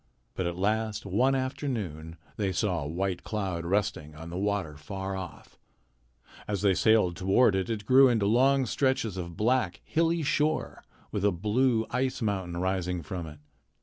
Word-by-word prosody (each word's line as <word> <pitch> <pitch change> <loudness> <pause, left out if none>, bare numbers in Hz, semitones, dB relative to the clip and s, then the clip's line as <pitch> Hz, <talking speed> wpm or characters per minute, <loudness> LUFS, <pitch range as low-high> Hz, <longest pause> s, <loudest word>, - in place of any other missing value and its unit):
But 95 - -2
at 85 - -3
last 110 +2 -1
one 125 +8 +2
afternoon 110 - -3 0.2
they 100 -3 -1
saw 90 -2 0
a 70 - -4
white 90 +3 -2
cloud 95 -6 -3
resting 85 -6 -1
on 80 +2 -9
the - - -6
water 100 -6 -1
far 95 +6 -5
off. 90 -7 -9 0.9
As 100 -1 -2
they 100 -2 +5
sailed 105 -3 +3
toward 95 +5 +3
it, 95 +3 -1
it 105 -3 -3
grew 130 +3 +7
into 115 -4 +2
long 130 +5 +4
stretches 130 -3 0
of 85 -2 -6
black, 110 -6 +1
hilly 165 0 +1
shore 150 +2 0 0.3
with 100 - -2
a 105 - +4
blue 110 +6 +1
ice 130 +1 -1
mountain 95 -6 -2
rising 90 -1 -1
from 85 +2 -5
it. 75 -1 -10
100 Hz, 165 wpm, -28 LUFS, 90-120 Hz, 0.9 s, grew